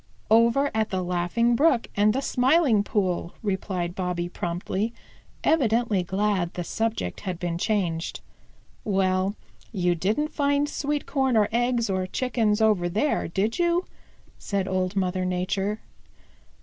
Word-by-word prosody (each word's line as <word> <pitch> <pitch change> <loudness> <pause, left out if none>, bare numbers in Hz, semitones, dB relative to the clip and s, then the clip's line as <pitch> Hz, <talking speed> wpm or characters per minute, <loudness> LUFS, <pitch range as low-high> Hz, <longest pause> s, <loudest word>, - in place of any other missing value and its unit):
"Over 235 +5 +4
at 220 -1 0
the 185 -1 -1
Laughing 180 +7 +1
Brook 280 -3 +3
and 205 +1 +4
the 265 +5 -1
Smiling 255 -5 +3
Pool," 185 -4 -1
replied 190 -3 -2
Bobby 180 -2 -2
promptly, 180 +6 -3 0.5
evidently 235 - +2
glad 190 -1 -1
the 175 - -3
subject 220 - -2
had 185 -3 -4
been 170 -1 -3
changed. 175 -6 -1 0.6
"Well, 190 0 +1 0.4
you 180 -5 +1
didn't 210 - 0
find 285 -1 +1
sweet 295 0 -2
corn 265 -4 +1
or 210 -1 +3
eggs 240 0 +1
or 185 -1 -1
Chickens 225 -2 0
over 205 -5 +3
there, 220 - 0
did 200 - -1
you?" 345 +1 +2 0.5
said 195 -2 -2
Old 185 0 -1
Mother 185 -1 0
Nature. 190 +3 -1
205 Hz, 135 wpm, -25 LUFS, 185-235 Hz, 0.6 s, Over